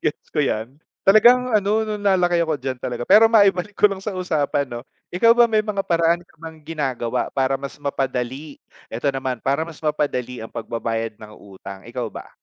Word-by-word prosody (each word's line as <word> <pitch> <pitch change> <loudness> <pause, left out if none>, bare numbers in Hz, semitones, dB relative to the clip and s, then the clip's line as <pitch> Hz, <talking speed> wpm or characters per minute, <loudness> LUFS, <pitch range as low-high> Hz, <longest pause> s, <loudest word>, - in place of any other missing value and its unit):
Gets 150 - -3
ko - - -5
yan, 115 +1 -3 0.3
talagang 245 +5 +6
ano, 200 -1 0 0.2
nung 210 -1 -4
na-laki 180 -3 +3
ako 155 -4 -2
diyan 130 0 -3
talaga 120 -1 -5
pero 215 +4 +8
maibalik 200 -2 +3
ko 210 +1 +4
lang 195 -1 -7
sa 210 - -3
usapan, 155 -6 -1
'no? 120 +1 -7 0.2
Ikaw 230 +6 +4
ba 240 0 +4
may 215 -1 +1
mga 210 -2 -2
paraan 170 0 +2
ka 175 -1 -23
bang 160 -1 -11
ginagawa 135 -6 -3
para 135 0 +1
mas 140 +1 -9
mapadali, 135 +1 -4 0.3
eto 120 +5 -1
naman 130 -3 -3
para 140 +4 0
mas 165 -2 -12
mapadali 125 -6 -2
ang - - -12
pag-babayad 115 -1 -4
ng 105 0 -13
utang, 95 -1 -11
ikaw - - -5
ba? - - -9
150 Hz, 190 wpm, -21 LUFS, 125-190 Hz, 0.3 s, pero